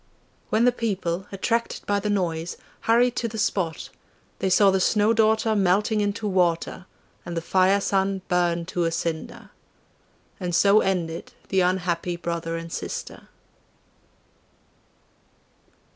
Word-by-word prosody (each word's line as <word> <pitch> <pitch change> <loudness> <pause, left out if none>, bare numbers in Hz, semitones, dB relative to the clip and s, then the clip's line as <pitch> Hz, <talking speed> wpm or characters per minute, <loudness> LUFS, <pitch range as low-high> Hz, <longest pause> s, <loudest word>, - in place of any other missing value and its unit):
When 225 +2 +3
the 250 - +5
people, 195 -6 -2
attracted 230 +4 -2
by 205 0 +1
the 210 +1 -3
noise, 170 -4 -1 0.3
hurried 240 +2 +4
to 235 - 0
the 220 0 -7
spot, 180 -6 -1 0.5
they 190 - 0
saw 195 +1 +5
the 190 - +1
Snow 210 +3 +3
daughter 220 0 +2
melting 205 +2 +2
into 205 +1 -1
water 180 -1 0 0.4
and 170 -1 -6
the - - +2
Fire 190 +3 +3
son 195 -1 0
burn 175 -2 +1
to 175 0 -1
a 165 - 0
cinder. 165 -1 -4 0.9
And 180 -3 -2
so 200 +3 +5
ended 170 -5 -2 0.2
the 190 - +2
unhappy 180 -1 0
brother 170 -1 -3
and 165 0 -7
sister. - - -6
190 Hz, 130 wpm, -24 LUFS, 170-210 Hz, 0.9 s, the